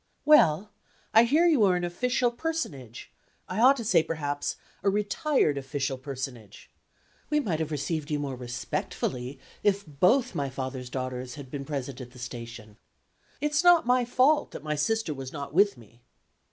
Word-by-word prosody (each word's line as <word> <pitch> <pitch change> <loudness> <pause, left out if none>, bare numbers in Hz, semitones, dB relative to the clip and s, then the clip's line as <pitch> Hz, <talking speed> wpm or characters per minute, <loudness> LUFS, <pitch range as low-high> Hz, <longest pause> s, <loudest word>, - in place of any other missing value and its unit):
"Well, 210 - +5 0.4
I 225 +2 +7
hear 305 +8 +3
you 305 -10 +4
are 190 -3 +4
an 175 - -1
official 245 +7 0
personage 235 - -5 0.4
I 185 - -3
ought 270 +3 +7
to 235 - -4
say, 180 -6 +4
perhaps, 145 -3 -3 0.3
a 200 - +2
retired 205 - +1
official 135 0 -2
personage. 130 -6 -7 0.6
We 300 - +2
might 180 - -1
have 160 -1 -2
received 150 +1 -3
you 150 - 0
more 140 -2 -3
respectfully, 125 +1 -4 0.2
if 200 0 +1
both 185 - +2
my 140 -1 -2
father's 130 -1 -5
daughters 130 -1 -4
had 135 -3 -10
been 140 -2 -5
present 140 -3 -5
at 125 -1 -10
the - - -14
station. 115 -3 -8 0.6
It's 295 +2 +1
not 350 -4 +6
my 250 0 +3
fault 255 +5 +3
that - - -8
my 150 0 -1
sister 220 +3 0
was 135 -2 -7
not 140 -2 -7
with 200 -1 +4
me." 115 +1 -18
150 Hz, 165 wpm, -27 LUFS, -, 0.6 s, I